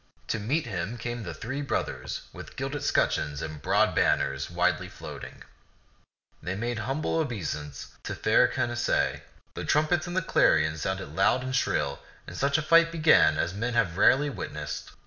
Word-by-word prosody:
To - - 0
meet 145 +10 0
him 100 +1 -4
came 120 +1 -4
the 85 -5 -6
three 135 - -4
brothers 140 - -3
with - - -10
gilded - - -3
scutcheons 75 -2 +1
and 80 -2 -6
broad - - +2
banners 70 0 +1
widely 90 -1 0
floating. - - -9 1.0
They 90 +2 -3
made 120 +3 -2
humble 135 +8 -1
obeisance 75 - -4
to - - -3
fair - - +4
Canacee; 120 -1 0 0.3
the - - -5
trumpets 155 +3 +1
and 175 +1 -4
the 185 - +1
clarions 80 - +3
sounded 95 0 -3
loud 105 +6 +3
and 130 0 -3
shrill, 70 - 0 0.3
and - - -9
such 140 +2 +2
a 155 - -1
fight 165 +1 +5
began 95 - +5
as 85 +3 -1
men 115 +4 -2
have 105 -8 +1
rarely 140 +9 +4
witnessed. - - -6
115 Hz, 165 wpm, -27 LUFS, 85-140 Hz, 1.0 s, fight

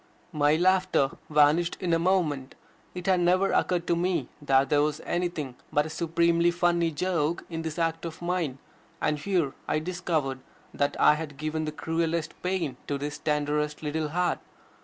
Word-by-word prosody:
My 150 0 +3
laughter 185 -5 +3 0.2
vanished 150 +3 +3
in 175 -2 0
a 165 - +3
moment. 165 -7 0 0.4
It 180 -1 -6
had 190 -2 +3
never 185 +2 +3
occurred 175 -1 +1
to 170 - +2
me 175 -6 0
that 135 -1 +3
there 145 -1 +4
was 150 0 0
anything 175 -7 -2 0.2
but 150 0 +2
a 155 - -6
supremely 170 +1 +2
funny 175 -1 +2
joke 165 0 -1
in 165 0 -3
this 160 0 -5
act 165 -1 -1
of 165 +1 -6
mine, 175 -6 -1 0.4
and 150 -1 0
here 170 -5 0
I - - +1
discovered 155 -5 -2 0.3
that 140 0 -1
I - - +7
had 150 -2 -5
given 155 +1 -2
the 155 - -3
cruelest 165 +1 -1
pain 180 -8 -1
to 140 - -1
this 145 +1 -5
tenderest 150 0 -1
little 155 0 -1
heart. 180 +3 0
160 Hz, 170 wpm, -27 LUFS, 150-175 Hz, 0.4 s, I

